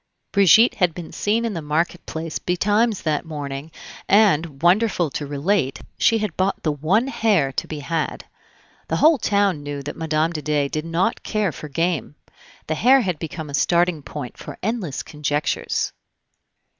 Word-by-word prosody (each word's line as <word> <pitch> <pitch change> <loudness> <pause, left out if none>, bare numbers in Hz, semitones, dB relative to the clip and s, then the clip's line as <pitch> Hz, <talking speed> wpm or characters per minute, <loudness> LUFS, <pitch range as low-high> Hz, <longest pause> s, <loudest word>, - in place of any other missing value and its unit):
Brigitte 200 +4 +6
had 180 -5 +1
been 175 -2 -8
seen 225 +3 0
in 225 - -2
the 165 - -4
market 160 +4 -1
place 160 0 -4
betimes 205 +4 +1
that 155 -2 0
morning, 145 -2 -6 0.4
and, 170 -8 +3
wonderful 180 -3 +3
to 145 - -4
relate, 145 0 0 0.2
she 230 - +3
had 215 -1 -3
bought 190 +1 -1
the 155 - +1
one 160 - +1
hare 210 - +1
to - - -3
be 150 -2 -6
had. 165 +1 -3 0.6
The - - -1
whole 310 -2 +5
town 200 -7 +1
knew 145 -1 -5
that 145 - -6
Mme. 160 0 0
de 155 -3 -4
Dey 145 -1 0
did 155 +2 -3
not 170 +7 0
care 215 -5 -1
for 150 +2 -9
game. 165 0 -1 0.5
The 155 - -1
hare 240 0 +4
became 160 -1 -7
a - - -10
starting 170 +2 +2
point 140 -3 -7
for - - -8
endless 200 - -2
conjectures. 150 0 -2
165 Hz, 165 wpm, -22 LUFS, 150-200 Hz, 0.6 s, Brigitte